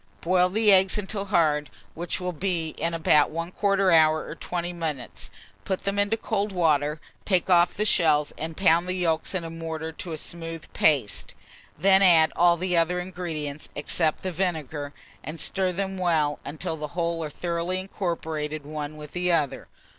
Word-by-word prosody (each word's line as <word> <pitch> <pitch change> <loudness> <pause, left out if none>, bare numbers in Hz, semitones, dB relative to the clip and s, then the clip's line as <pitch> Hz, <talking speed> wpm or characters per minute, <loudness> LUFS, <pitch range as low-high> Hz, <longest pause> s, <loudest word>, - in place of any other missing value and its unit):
Boil 180 +1 +3
the 210 +2 +3
eggs 190 0 +4
until 200 0 -3
hard, 155 -6 +2 0.2
which 175 +2 -3
will 180 0 -2
be 175 -1 -1
in 165 +2 -3
about 150 -2 +4
1/4 185 +3 +1
hour 155 -1 +4
or - - -6
20 175 +1 -4
minutes; 155 -7 -4 0.3
put 190 -1 -2
them 200 0 -1
into 205 +2 +1
cold 210 -2 -2
water, 150 -4 +1 0.2
take 185 -1 +1
off 175 0 +4
the 210 - 0
shells, 155 -7 +3
and 160 0 -6
pound 175 -2 +3
the 185 - -2
yolks 165 0 -1
in 180 - -1
a 165 - -5
mortar 160 -1 -5
to 165 +2 -7
a 160 - -4
smooth 165 0 -5
paste. 140 -10 +1 0.4
Then 190 +4 +5
add 165 -4 +6
all 170 0 +4
the 180 +1 -1
other 170 +2 +2
ingredients, 165 -5 -5
except 155 +2 0
the 185 - -2
vinegar, 160 -5 -3 0.3
and 160 +1 -7
stir 190 -1 0
them 190 +1 -3
well 155 -5 +1
until 155 +2 -4
the 150 +3 -7
whole 170 -1 -1
are 155 - -4
thoroughly 170 +3 -2
incorporated 160 -6 -4
one 150 0 -5
with 150 -1 -9
the 180 0 0
other. 150 -5 0
170 Hz, 175 wpm, -25 LUFS, 155-185 Hz, 0.4 s, add